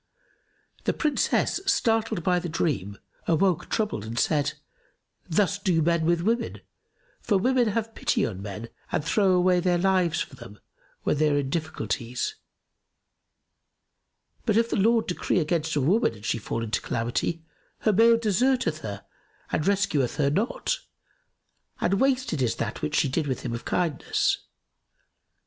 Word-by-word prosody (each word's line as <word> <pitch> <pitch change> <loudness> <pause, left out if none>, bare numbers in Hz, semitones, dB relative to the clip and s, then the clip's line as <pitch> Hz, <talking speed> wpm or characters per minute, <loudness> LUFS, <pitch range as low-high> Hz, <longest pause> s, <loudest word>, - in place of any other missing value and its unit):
The - - +2
Princess 305 +4 +1
startled 225 - +1
by 180 0 +2
the 175 0 -5
dream 110 - -1 0.3
awoke 180 +1 +2
troubled, 210 - -1
and 115 +2 -6
said, 145 +1 +1 0.8
'Thus 200 +3 +1
do 185 -5 +1
men 170 0 +2
with 170 0 +2
women, 230 +5 -1 0.6
for 210 -4 +2
women 250 +4 +2
have 225 +1 -2
pity - - +1
on 95 -4 -5
men 105 +3 -6 0.2
and 150 - -1
throw 195 +2 +3
away 180 0 +4
their 175 0 +2
lives 180 -3 +2
for - - -4
them, 115 -5 -12 0.5
when - - +1
they 155 +1 +3
are 145 - +2
in 135 -2 -1
difficulties; 125 - -2 2.1
but 215 -1 +3
if 230 0 +2
the - - +1
Lord 225 +2 +3
decree 180 - -1
against 160 -1 0
a 145 - +2
woman 175 - +2
and 105 0 -12
she 115 - 0
fall 115 +2 -3
into 110 -1 -1
calamity, 120 +8 -2 0.4
her 215 - +3
mate 230 +3 +5
deserteth 215 -5 +2
her 100 -7 -7 0.5
and 155 - 0
rescueth 195 -10 +1
her 140 -2 +2
not, 230 - -1 1.0
and 195 +2 +1
wasted 260 - +1
is 120 -3 +1
that - - -4
which 75 - -2
she - - +3
did 145 +3 -1
with 130 -3 -2
him - - -4
of 115 - -6
kindness. 170 -5 0
170 Hz, 155 wpm, -26 LUFS, 140-210 Hz, 2.1 s, mate